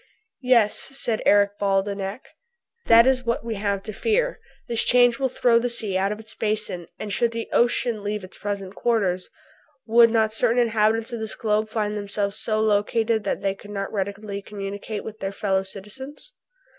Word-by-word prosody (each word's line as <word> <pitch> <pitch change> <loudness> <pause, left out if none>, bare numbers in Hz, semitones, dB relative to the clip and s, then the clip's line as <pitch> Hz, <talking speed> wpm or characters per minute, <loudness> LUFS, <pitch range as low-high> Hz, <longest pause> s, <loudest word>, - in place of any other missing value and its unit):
"Yes," 240 -5 +4
said 255 -5 -2
Eric 205 0 +4
Baldenak, 195 +2 -1 0.7
"that 230 0 +8
is 260 -1 +2
what 235 -1 -1
we 230 - -2
have 200 -1 -1
to 215 - -6
fear; 485 - 0 0.3
this 235 -1 0
change 245 0 +4
will 265 -1 +1
throw 235 -2 +3
the 245 +1 -1
sea 220 -5 -3
out 195 +2 +1
of 210 - -4
its 220 0 -7
basin, 210 -5 -2
and 205 -2 -5
should 235 - +2
the 230 0 -4
ocean 235 -2 +1
leave 210 -1 -3
its 185 - -12
present 200 -2 -4
quarters, 200 -6 0 0.6
would 230 +1 +6
not 220 -1 +2
certain 235 +1 +1
inhabitants 225 0 +2
of 235 - -3
this 220 -1 -4
globe 215 0 0
find 210 -1 -1
themselves 200 0 -2
so 215 -1 0
located 220 +1 +1
that - - -1
they 195 -1 0
could 205 +1 -14
not 195 0 -4
readily 200 0 -3
communicate 200 +1 -6
with 220 0 -8
their 195 0 -3
fellow 195 -1 0
citizens?" 215 - -10
215 Hz, 180 wpm, -24 LUFS, 200-235 Hz, 0.7 s, that